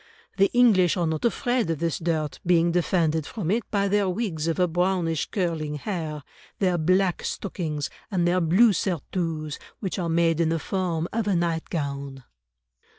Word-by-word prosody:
The 195 0 +4
English 205 -8 +4
are 175 - +1
not 160 +3 -1
afraid 240 -3 +1
of 165 - 0
this 165 +1 -1
dirt, 160 -3 -2
being 170 -1 +3
defended 165 -3 +1
from 190 -6 -3
it 230 +3 +2
by 200 -1 +1
their 200 -1 +2
wigs 180 -6 -2
of 165 - 0
a 180 - +4
brownish 175 -2 0
curling 165 -6 -2
hair, 155 -3 -4 0.3
their 180 -3 +1
black 185 +2 +2
stockings, 155 -7 -3 0.2
and 175 -4 +1
their 180 +1 +2
blue 195 +7 +5
surtouts, 165 -4 -2 0.2
which 195 -1 -3
are 170 -2 -1
made 165 0 +2
in 165 -1 +2
the 165 - +1
form 170 -1 -2
of 225 -1 -1
a 200 - +2
nightgown." 140 -5 -2
170 Hz, 165 wpm, -25 LUFS, 160-190 Hz, 0.3 s, blue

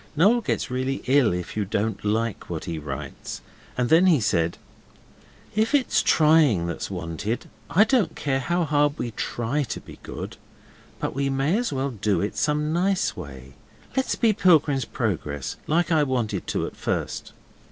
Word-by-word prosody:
Noel 210 +10 +4
gets 205 - -2
really 130 +2 -2
ill 130 -3 +4
if 90 0 -4
you 105 - 0
don't 105 +3 -2
like 110 +1 -1
what 85 -3 -4
he 85 -3 -4
writes, 70 -3 -6 0.4
and 125 -1 +1
then 170 +4 +6
he 165 -6 +5
said, 85 -6 +1 1.0
'If 220 +7 +2
it's 270 -3 +3
trying 150 - +4
that's 85 - -4
wanted, 90 +5 -4 0.2
I 200 - +6
don't 225 -5 +1
care 135 -2 0
how 175 +6 0
hard 145 -1 +2
we 120 - -3
TRY 120 +6 -2
to 125 -6 -3
be - - -13
good, - - -7 0.6
but - - -2
we 140 +1 0
may 135 +6 +1
as 245 +2 0
well 135 0 -1
do 105 -3 0
it 100 - -2
some 150 +1 0
nice 185 +2 +1
way. 65 -1 -9 0.4
Let's 265 0 +1
be 225 -3 +3
Pilgrim's 155 -8 +3
Progress, 80 - -3
like 170 +3 +1
I 160 -2 +4
wanted 120 -8 -1
to - - -1
at - - -7
first. - - -3
135 Hz, 170 wpm, -25 LUFS, 105-160 Hz, 1.0 s, then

